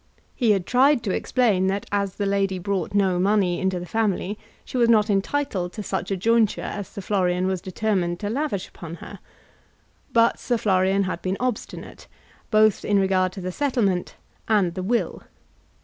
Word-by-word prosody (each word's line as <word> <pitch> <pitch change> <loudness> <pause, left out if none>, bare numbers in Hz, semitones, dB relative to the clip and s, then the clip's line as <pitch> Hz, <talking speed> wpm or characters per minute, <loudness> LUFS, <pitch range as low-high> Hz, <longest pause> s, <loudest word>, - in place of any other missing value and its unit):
He 240 -4 +1
had 195 -4 +2
tried 260 +2 +3
to 200 - -1
explain 210 -7 +1
that 195 +1 -1
as 200 -2 -1
the 205 - -2
lady 195 -1 0
brought 195 +1 -2
no 190 -3 +2
money 190 -2 +2
into 190 -1 0
the 175 - -6
family 205 0 -1 0.3
she - - -10
was 235 -2 +3
not 215 -2 +4
entitled 195 -3 -1
to 210 - -6
such 190 - -3
a 195 - -1
jointure 225 +2 +2
as 205 -2 -5
Sir 200 - -8
Florian 185 -2 0
was 190 -2 -1
determined 185 -3 -1
to 205 - -2
lavish 265 -7 -2
upon 170 -1 -9
her. - - -11 0.9
But 230 0 +3
Sir 240 - 0
Florian 195 -1 +2
had 185 -2 -3
been 190 +1 -2
obstinate, 250 -3 -5 0.4
both 215 -1 +4
in 205 - +2
regard 190 -1 +2
to 195 - -7
the 185 0 -3
settlement 210 -8 0 0.3
and 200 -6 +2
the 185 - -4
will. 230 +6 -1
200 Hz, 180 wpm, -24 LUFS, 185-220 Hz, 0.9 s, not